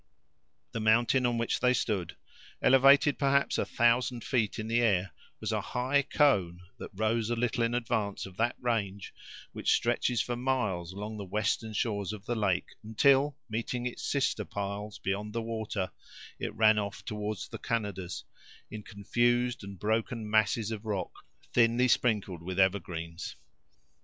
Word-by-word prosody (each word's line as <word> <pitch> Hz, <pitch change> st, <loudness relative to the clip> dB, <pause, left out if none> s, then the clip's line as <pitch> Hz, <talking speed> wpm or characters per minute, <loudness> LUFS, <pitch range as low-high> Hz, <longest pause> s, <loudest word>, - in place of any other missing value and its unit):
The 115 Hz, -, -3 dB
mountain 120 Hz, +4 st, +3 dB
on 120 Hz, -1 st, 0 dB
which 115 Hz, 0 st, 0 dB
they 125 Hz, 0 st, +3 dB
stood, 100 Hz, -7 st, -2 dB, 0.4 s
elevated 135 Hz, +2 st, +5 dB
perhaps 140 Hz, -1 st, +2 dB
a -, -, +1 dB
thousand 120 Hz, 0 st, +2 dB
feet 115 Hz, -5 st, 0 dB
in 110 Hz, -, -4 dB
the 115 Hz, +1 st, +2 dB
air, 95 Hz, -6 st, +2 dB, 0.3 s
was -, -, -3 dB
a -, -, 0 dB
high 130 Hz, +3 st, +1 dB
cone 105 Hz, -, +2 dB, 0.2 s
that -, -, -7 dB
rose 110 Hz, +2 st, 0 dB
a 120 Hz, -, +1 dB
little 120 Hz, 0 st, 0 dB
in 115 Hz, +1 st, +1 dB
advance 110 Hz, -4 st, -1 dB
of 95 Hz, -2 st, -11 dB
that 120 Hz, +2 st, +1 dB
range 100 Hz, -5 st, -2 dB, 0.4 s
which -, -, +1 dB
stretches 120 Hz, 0 st, +1 dB
for 120 Hz, -, -1 dB
miles 110 Hz, -9 st, -1 dB
along 105 Hz, +3 st, -6 dB
the 100 Hz, -, -5 dB
western 105 Hz, +3 st, -1 dB
shores 105 Hz, -2 st, -1 dB
of 105 Hz, -2 st, -9 dB
the 120 Hz, -, -1 dB
lake, 100 Hz, -5 st, 0 dB
until 135 Hz, +6 st, +3 dB
meeting 120 Hz, +2 st, -3 dB
its 125 Hz, -, -4 dB
sisters 130 Hz, -6 st, 0 dB
miles 100 Hz, +1 st, -4 dB
beyond 105 Hz, +2 st, -3 dB
the 115 Hz, -, -1 dB
water, 110 Hz, -4 st, -3 dB, 0.5 s
it -, -, -4 dB
ran 110 Hz, 0 st, +5 dB
off 100 Hz, -1 st, -5 dB
toward 105 Hz, -1 st, -3 dB
the -, -, -6 dB
Canadas, 100 Hz, -5 st, -3 dB, 0.5 s
in 110 Hz, -, -6 dB
confused 120 Hz, +4 st, 0 dB
and 100 Hz, 0 st, -8 dB
broken 110 Hz, +3 st, -1 dB
masses 110 Hz, +1 st, +2 dB
of 110 Hz, -1 st, -5 dB
rock, 105 Hz, -4 st, -3 dB, 0.4 s
thinly 120 Hz, +1 st, +4 dB
sprinkled 105 Hz, -8 st, +1 dB
with 95 Hz, +2 st, -4 dB
evergreens. 90 Hz, -3 st, -1 dB
110 Hz, 155 wpm, -30 LUFS, 100-120 Hz, 0.5 s, elevated